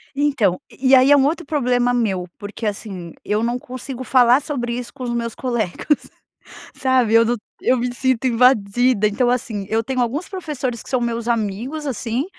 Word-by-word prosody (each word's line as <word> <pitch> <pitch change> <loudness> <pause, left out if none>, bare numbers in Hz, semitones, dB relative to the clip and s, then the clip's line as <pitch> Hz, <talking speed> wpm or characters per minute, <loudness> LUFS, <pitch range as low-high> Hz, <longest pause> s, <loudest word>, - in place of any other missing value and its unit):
Então, 270 -11 +1
e 260 0 -2
e 270 - +8
aí, 260 +2 +6
é 290 - +8
um 270 - +4
outro 325 +3 -1
problema 245 -4 +1
meu. 195 -7 0
Porque, 205 +2 -7
assim, 195 -5 -5
eu 210 +2 0
não 240 +1 -1
consigo 255 +1 -7
falar 250 +1 +5
sobre 245 -5 -3
isso 245 -1 -6
com 265 -2 -8
os 240 - -2
meus 235 -1 -3
colegas, 240 - -1 0.7
sabe? 255 -4 +2
Eu 230 0 +7
não 240 +1 0 0.3
eu 255 - +3
me 245 0 -2
sinto 260 0 0
invadida. 240 -2 +3
Então, 240 +4 +1
assim, 225 -5 -2
eu 225 +1 +1
tenho 255 +2 -2
alguns 260 +8 -1
professores 290 - -4
que - - -13
são 255 - +1
meus 235 -1 -2
amigos, 235 +7 -2
assim, 245 +1 -2
245 Hz, 190 wpm, -20 LUFS, 225-260 Hz, 0.7 s, e